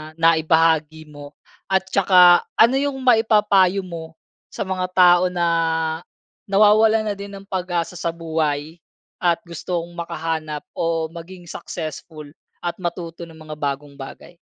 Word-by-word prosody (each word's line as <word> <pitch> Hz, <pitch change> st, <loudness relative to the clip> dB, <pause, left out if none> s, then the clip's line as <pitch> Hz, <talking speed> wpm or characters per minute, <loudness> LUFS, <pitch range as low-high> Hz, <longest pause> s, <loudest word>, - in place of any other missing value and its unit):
naibahagi 160 Hz, -1 st, +2 dB
mo? 145 Hz, 0 st, -12 dB, 0.3 s
At 190 Hz, -1 st, +1 dB
saka, 180 Hz, -2 st, +5 dB
ano 235 Hz, +4 st, +5 dB
yung 280 Hz, -1 st, -1 dB
maipapayo 210 Hz, -5 st, +3 dB
mo 165 Hz, -2 st, -9 dB, 0.3 s
sa -, -, -5 dB
mga 185 Hz, -1 st, -3 dB
tao 175 Hz, -1 st, +6 dB
na 175 Hz, -1 st, -1 dB, 1.0 s
nawawalan 215 Hz, +2 st, +4 dB
na -, -, -4 dB
din 200 Hz, 0 st, -9 dB
ng 195 Hz, -, -10 dB
pag-asa 180 Hz, -2 st, -3 dB
sa -, -, -3 dB
buhay 160 Hz, -1 st, -3 dB, 0.4 s
at 175 Hz, -2 st, +2 dB
gustong 170 Hz, 0 st, -5 dB
makahanap 165 Hz, -3 st, -4 dB
o 165 Hz, -1 st, -2 dB
maging 175 Hz, +2 st, -11 dB
successful 155 Hz, -2 st, -7 dB, 0.4 s
at 175 Hz, -1 st, -2 dB
matuto 170 Hz, -1 st, -6 dB
ng 165 Hz, -, -15 dB
mga 155 Hz, -1 st, -9 dB
bagong 140 Hz, 0 st, -4 dB
bagay? 155 Hz, +5 st, -11 dB
170 Hz, 130 wpm, -21 LUFS, 160-190 Hz, 1.0 s, tao